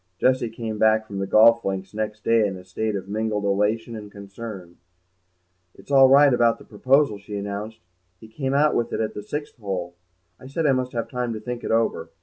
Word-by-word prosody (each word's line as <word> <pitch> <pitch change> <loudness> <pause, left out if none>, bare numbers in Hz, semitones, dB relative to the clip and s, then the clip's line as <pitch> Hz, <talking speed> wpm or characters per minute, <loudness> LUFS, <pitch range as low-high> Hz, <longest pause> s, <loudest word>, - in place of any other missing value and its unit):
Jessie 130 0 +2
came 110 -1 -5
back 110 0 +3
from 100 -2 -6
the 95 - -2
golf 115 +3 +6
links 95 0 -4
next 110 0 -4
day 115 -2 +3
in 95 -1 -5
a 90 - -12
state 105 +3 -3
of 95 -1 -5
mingled 105 0 -2
elation 105 +4 0
and 105 -2 -9
concern. 100 -3 -9 1.0
"It's - - -14
all 135 -1 +7
right 140 0 +6
about 120 -1 +3
the - - -16
proposal," 130 +1 +2
she 100 +1 -7
announced; 100 +2 -5 0.4
"he 110 - -13
came 135 +4 -3
out 150 +1 +3
with 120 - -1
it - - -1
at 110 -1 -2
the - - -6
sixth 145 +8 -6
hole. 95 -5 -4 0.5
I 130 - -12
said 155 +4 -2
I 145 - +5
must 130 -1 -1
have 115 -1 -2
time 125 -2 -3
to 110 - -5
think 120 +2 -6
it - - -4
over. 115 0 0
110 Hz, 215 wpm, -23 LUFS, 100-120 Hz, 1.0 s, all